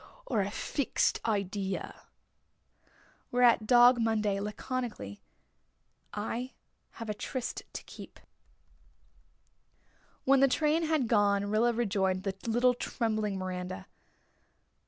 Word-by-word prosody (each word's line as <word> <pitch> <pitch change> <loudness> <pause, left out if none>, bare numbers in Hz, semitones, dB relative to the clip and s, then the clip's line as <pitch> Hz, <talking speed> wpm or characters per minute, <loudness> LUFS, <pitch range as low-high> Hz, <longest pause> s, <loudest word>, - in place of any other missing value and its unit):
Or 220 - +1
a 195 - -1
fixed 260 +5 0
idea?" 200 -2 -3 1.2
Whereat 240 -3 +4
Dog 245 +1 +7
Monday, 215 -3 +1
laconically: 210 - -4 0.9
"I 230 +5 -4 0.4
have 230 - -7
a 210 - -1
tryst 240 +4 -4
to - - -6
keep." - - -12 2.0
When 275 0 +5
the 275 - +6
train 310 +4 +1
had 310 -6 +1
gone 205 -3 +3
Rilla 230 +3 +3
rejoined 195 -5 0
the 195 -1 -2
little 245 +2 +3
trembling 215 -4 -2
Miranda. 185 0 -5
220 Hz, 100 wpm, -30 LUFS, 200-245 Hz, 2.0 s, Dog